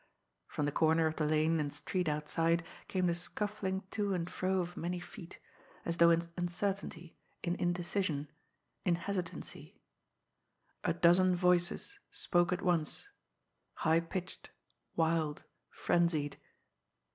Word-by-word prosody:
From 150 - -2
the 145 - 0
corner 160 +2 +3
of 160 0 0
the 155 - +1
lane 155 +1 +3
and 145 -1 -1
street 180 +1 -1
outside 165 +3 +1 0.2
came 185 -1 0
the 175 - +3
scuffling 190 +2 -2
to 205 -3 0
and 170 -1 -2
fro 185 +1 0
of 175 0 -3
many 175 +2 -2
feet, 175 0 -10 0.5
as 170 0 -1
though 170 0 +7
in 170 0 +3
uncertainty, 175 -1 -3 0.3
in 175 - +1
indecision, 175 -3 0 0.6
in 175 - +3
hesitancy. 180 0 -5 1.0
A - - +2
dozen 180 +2 +5
voices 180 - +2
spoke 175 -1 +2
at 180 +1 -1
once, 170 -4 0 0.8
high 160 +1 +5
pitched, 180 +2 -5 0.5
wild, 160 -2 +1 0.3
frenzied. 160 -4 +1
175 Hz, 125 wpm, -34 LUFS, 165-180 Hz, 1.0 s, though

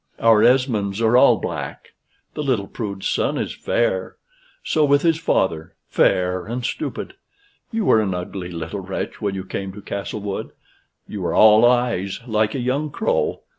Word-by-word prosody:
Our 115 -2 +5
Esmonds 115 -6 +2
are 115 +1 +3
all 125 - +6
black. - - -6 0.4
The - - -4
little 130 -9 0
prude's 100 -3 -5
son - - 0
is - - -3
fair; - - -1 0.5
so 155 - +1
was 145 0 +3
his 165 -2 +2
father 80 - 0
fair 90 0 +1
and 120 +2 -4
stupid. 315 - -4 0.6
You 225 -3 -1
were 110 - +5
an 95 -4 -1
ugly 90 0 -5
little 85 +4 -5
wretch 95 0 -5
when 100 -2 -1
you 95 - -4
came 95 0 -5
to 105 - -10
Castlewood 100 0 -5 0.5
you 105 - -6
were 85 -2 -1
all 110 +1 +7
eyes, 120 -6 0
like 110 -2 0
a - - -2
young 135 +5 -1
crow. 485 - -1
110 Hz, 165 wpm, -21 LUFS, 95-135 Hz, 0.6 s, all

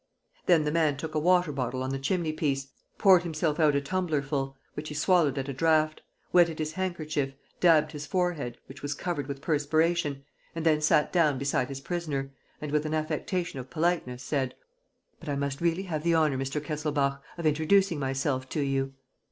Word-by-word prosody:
Then 165 -3 +5
the 150 - 0
man 155 -3 +2
took 155 +2 -5
a 155 - +1
water 180 0 +3
bottle 130 -2 -2
on 130 - -2
the 135 - -2
chimneypiece, 155 -4 -1 0.3
poured 190 -3 +6
himself 160 -2 -1
out 150 -3 +4
a 140 - +2
tumblerful, 140 -5 -1 0.2
which 155 +1 -6
he 150 - -6
swallowed 150 -2 +3
at 135 0 -2
a 140 - -3
draught, 155 +2 +2 0.3
wetted 170 -3 +5
his 155 0 -3
handkerchief, 155 -7 -2 0.2
dabbed 155 -3 +5
his 150 -1 -7
forehead, 170 -10 -1
which 135 +2 -12
was 145 0 -3
covered 155 -4 -3
with 140 -1 -5
perspiration, 155 -1 +1 0.3
and 165 -1 -3
then 155 -2 +4
sat 150 -1 +3
down 155 -6 +3
beside 135 -1 0
his 135 -1 -6
prisoner 145 -5 -3 0.3
and, 150 -1 -5
with 150 +1 +1
an 155 - -1
affectation 155 +1 -2
of 125 - -8
politeness, 155 -7 -1
said: 135 -3 -1 0.6
"But 165 - -8
I 145 - 0
must 140 0 -2
really 170 +2 +1
have 160 -5 -3
the 170 0 +3
honor, 155 -4 +3
Mr. 135 +2 -2
Kesselbach, 145 -2 -1 0.2
of 170 - -5
introducing 160 +3 +3
myself 135 -1 -1
to 150 - -1
you." 135 -1 -1
150 Hz, 185 wpm, -28 LUFS, 140-165 Hz, 0.6 s, poured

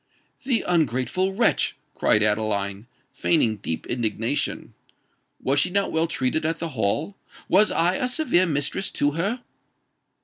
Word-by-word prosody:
"The 250 -4 +1
ungrateful 170 - 0
wretch!" 235 - +2 0.2
cried 105 - +3
Adeline, 105 -1 0 0.2
feigning 115 -10 +1
deep 80 -5 -5
indignation. 115 +2 -2 0.7
"Was 140 +2 +1
she 180 - +2
not 200 +2 0
well 160 +1 +1
treated 135 +1 -1
at 160 +1 -1
the 165 - -4
Hall? 135 - -1 0.3
was 210 +2 +4
I 175 +3 +1
a 250 - 0
severe 250 - +2
mistress 145 +5 -1
to 145 - 0
her?" 200 - -2
155 Hz, 135 wpm, -24 LUFS, 115-185 Hz, 0.7 s, was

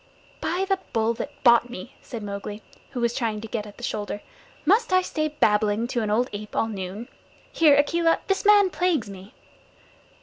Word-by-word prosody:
"By 360 +4 0
the 390 -1 +1
Bull 225 0 +2
that 290 - -9
bought 235 -1 +6
me," 245 +1 -8
said 235 -5 -7
Mowgli, 205 +1 -6 0.3
who 260 - -5
was 235 0 +1
trying 225 -4 -1
to 225 - -7
get 215 -1 -4
at 205 - -13
the - - -12
shoulder, 205 -1 -4 0.4
"must 420 +6 +3
I 370 0 +4
stay 310 -3 -1
babbling 215 -6 +2
to 245 -3 -1
an 215 - -2
old 235 +4 +2
ape 210 +1 -7
all 225 - +1
noon? 200 +2 -6 0.4
Here, 305 -3 +5
Akela, 330 +3 +3
this 390 -1 0
man 410 -2 +6
plagues 335 - 0
me." 195 +1 -12
235 Hz, 190 wpm, -25 LUFS, 210-325 Hz, 0.4 s, bought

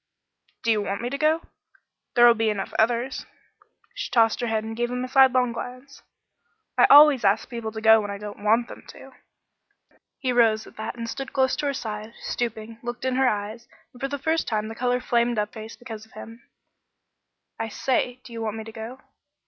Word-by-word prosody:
"Do 230 - +2
you 215 -1 +2
want 200 +1 -3
me 245 - -3
to 280 - -2
go? 315 +2 +2 0.7
There'll 240 0 +8
be 225 -1 0
enough 205 -2 -3
others 240 +3 0 0.3
" - - -35
She - - -5
tossed 225 -2 +3
her 240 - -1
head 220 -1 0
and 225 0 -6
gave 240 +1 -1
him 250 0 -3
a - - -3
sidelong 255 -2 +4
glance. 250 +4 -8 0.7
"I - - +6
always 290 -3 +8
ask 200 +2 +2
people 235 -3 -5
to 220 0 -7
go 220 0 +6
when 205 - -5
I 200 - -4
don't 205 0 -9
want 225 +3 +3
them - - -11
to." - - -13 1.1
He 255 -3 -1
rose 225 -2 +3
at - - -15
that 220 +3 -5
and 230 -1 -5
stood 270 +3 -6
close 265 -2 +2
to 290 - -1
her 280 - 0
side, 215 -4 -5
and, 230 - -16
stooping, 225 -1 -4
looked 240 +1 -6
in 260 - +1
her 265 -1 +4
eyes; 215 +3 -4 0.3
and 245 - -16
for 275 - 0
the 285 +1 -4
first 320 +4 0
time 215 -1 -1
the - - -6
color 250 +1 0
flamed 235 -1 +1
up 210 0 -2
in 220 - -6
her 215 - -7
face 225 - -11
because 225 -3 -9
of - - -26
him. 230 +2 -12 1.1
"I 225 - -2
say 250 +2 -1
do 235 - -12
you 230 - -5
want 220 -1 -3
me 220 - -5
to 225 - -10
go?" 225 +4 -8
235 Hz, 220 wpm, -25 LUFS, 220-255 Hz, 1.1 s, There'll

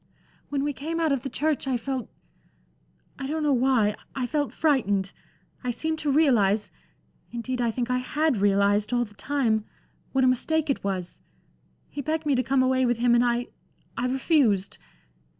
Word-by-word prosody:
"When 280 -1 -1
we 290 0 -1
came 325 +5 -4
out 320 -2 +2
of 275 -3 +1
the 270 - -5
church, 295 +2 -1
I 260 -2 +1
felt 260 0 -4 1.1
I 270 - -3
don't 310 +2 -2
know 295 -2 +3
why 245 -5 +2 0.2
I 260 - -1
felt 290 +3 -1
frightened. 205 -11 +1 0.5
I 250 - -2
seemed 315 +6 -2
to 295 - 0
realize 225 -9 +3 0.6
indeed, 245 +1 -3
I 235 - +2
think 240 +2 -2
I 250 - +2
had 295 +1 0
realized 205 +2 +2
all 240 0 +2
the 205 - -16
time 225 -3 0 0.5
what 265 0 +2
a - - +5
mistake 305 +4 +1
it - - -3
was. 185 -3 -4 0.7
He 290 - -6
begged 310 +2 -2
me 290 - +2
to 255 - +2
come 260 +1 +2
away 260 0 +2
with 240 -2 +2
him, 240 0 +3
and 240 0 +4
I 240 0 0 0.5
I 240 +2 -1
refused. 255 - +1
255 Hz, 180 wpm, -26 LUFS, 230-285 Hz, 1.1 s, a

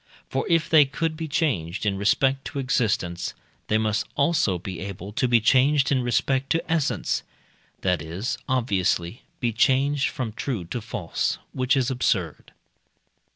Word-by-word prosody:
For 135 - -1
if 165 -2 +3
they 155 -2 +7
could 155 +3 -2
be 160 0 -4
changed 105 - -1
in 100 -2 +1
respect 135 +7 +2
to - - -6
existence, 105 -10 -1 0.3
they 110 - +2
must 110 -1 0
also 140 - +2
be 90 0 -7
able 95 +1 -6
to 125 +3 +1
be 120 -1 +5
changed 135 +5 +3
in 130 -2 +3
respect 130 +2 0
to 165 0 -2
essence 160 -4 0 0.6
that 90 -4 +1
is, 85 - -4
obviously, 100 -5 0 0.2
be 120 -2 0
changed 135 +4 +2
from 115 -4 -4
true 115 -5 -3
to 105 +8 -4
false, 100 -5 -2 0.2
which 130 +2 +1
is 130 0 +1
absurd. 95 - -1
120 Hz, 155 wpm, -25 LUFS, 100-135 Hz, 0.6 s, they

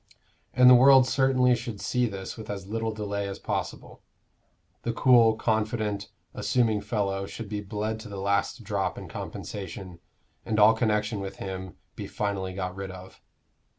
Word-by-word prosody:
And 125 0 +7
the 125 - +10
world 130 +1 +7
certainly 130 -2 +3
should 115 -3 -6
see 125 +3 0
this 100 -3 -6
with 110 -2 -10
as 100 -2 -5
little 110 +2 -2
delay 100 -2 -3
as 100 - -5
possible. - - -5 0.8
The 115 - -2
cool, 115 -2 +5
confident, 110 -2 -1 0.2
assuming 110 -4 +1
fellow 100 -2 -2
should 115 +1 -7
be 105 0 -4
bled 105 +2 -3
to 110 - -10
the 100 - -7
last 100 +5 -1
drop 100 -2 -2
in - - -8
compensation, 95 -2 -7 0.4
and 110 -1 -1
all 105 +2 +7
connection 105 -2 0
with 95 0 -6
him 95 -2 -6 0.2
be - - -6
finally 100 -3 -3
got 90 -1 -4
rid 95 0 -6
of. 95 0 -11
105 Hz, 160 wpm, -27 LUFS, 100-115 Hz, 0.8 s, the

